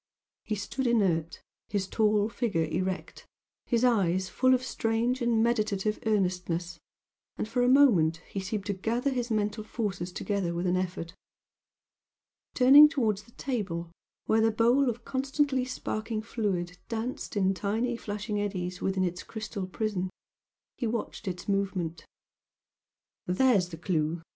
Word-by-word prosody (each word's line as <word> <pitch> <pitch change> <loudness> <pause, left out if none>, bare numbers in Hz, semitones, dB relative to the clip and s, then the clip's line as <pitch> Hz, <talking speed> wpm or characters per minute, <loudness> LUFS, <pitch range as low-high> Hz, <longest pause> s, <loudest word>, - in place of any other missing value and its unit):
He 215 - -2
stood 245 +6 -3
inert 175 -8 +1 0.3
his 195 -2 -1
tall 210 -1 +2
figure 210 -8 -1
erect 185 +4 -3 0.4
his 235 -1 +1
eyes 190 -6 +2
full 255 0 +4
of 255 - -2
strange 235 +1 0
and 235 -2 +2
meditative 215 -3 0
earnestness, 180 -4 -1 0.6
and - - -2
for 245 +2 0
a 245 - +4
moment 210 - +5
he 195 - -4
seemed 195 +1 -3
to 205 - -1
gather 235 +8 -1
his 245 -2 -2
mental 215 0 -1
forces 200 -5 -3
together 185 -2 -2
with 175 +2 -2
an 180 0 +2
effort. 180 -2 -3 1.4
Turning 280 +4 +9
towards 220 -9 0
the 225 +3 -21
table 185 -10 -3 0.3
where 220 0 +3
the 225 - +4
bowl 240 +5 +3
of 235 0 -5
constantly 270 0 0
sparkling 220 -3 -3
fluid 185 -6 -2
danced 230 -1 -4
in 190 -1 +3
tiny 220 +6 -1
flashing 210 -1 -3
eddies 180 -3 -3
within 190 -1 0
its 180 0 -2
crystal 215 -3 -5
prison, 190 -2 -2 0.7
he 240 - 0
watched 225 -1 -4
its 180 -1 -4
movement. 190 -5 -2 1.2
"There's 190 -1 +3
the 165 - -8
clue!" 165 -1 -1
210 Hz, 140 wpm, -29 LUFS, 185-235 Hz, 1.4 s, Turning